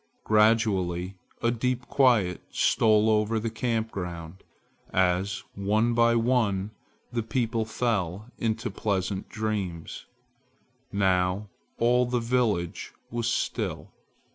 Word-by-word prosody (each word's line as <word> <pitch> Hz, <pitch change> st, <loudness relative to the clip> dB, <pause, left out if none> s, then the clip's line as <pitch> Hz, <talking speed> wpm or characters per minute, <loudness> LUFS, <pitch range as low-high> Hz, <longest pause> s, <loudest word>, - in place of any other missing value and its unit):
Gradually 100 Hz, -5 st, +2 dB, 0.3 s
a 115 Hz, -, +3 dB
deep 125 Hz, +1 st, -1 dB
quiet 120 Hz, -10 st, +3 dB
stole 110 Hz, -1 st, +3 dB
over 110 Hz, +1 st, +2 dB
the 115 Hz, +1 st, -3 dB
camp 115 Hz, -1 st, -1 dB
ground, 85 Hz, -1 st, -6 dB, 0.5 s
as 95 Hz, +2 st, +1 dB
one 110 Hz, +4 st, +1 dB
by 115 Hz, 0 st, +4 dB
one 115 Hz, -4 st, +1 dB, 0.4 s
the 120 Hz, -1 st, -1 dB
people 115 Hz, 0 st, -1 dB
fell 110 Hz, -2 st, -2 dB
into 115 Hz, +1 st, -1 dB
pleasant 95 Hz, -2 st, -2 dB
dreams. 100 Hz, -7 st, -4 dB, 0.8 s
Now 95 Hz, +1 st, +1 dB, 0.3 s
all 125 Hz, +1 st, +3 dB
the 125 Hz, 0 st, 0 dB
village 115 Hz, -8 st, -1 dB, 0.2 s
was 120 Hz, 0 st, -1 dB
still. 115 Hz, -, -2 dB
110 Hz, 105 wpm, -27 LUFS, 95-115 Hz, 0.8 s, by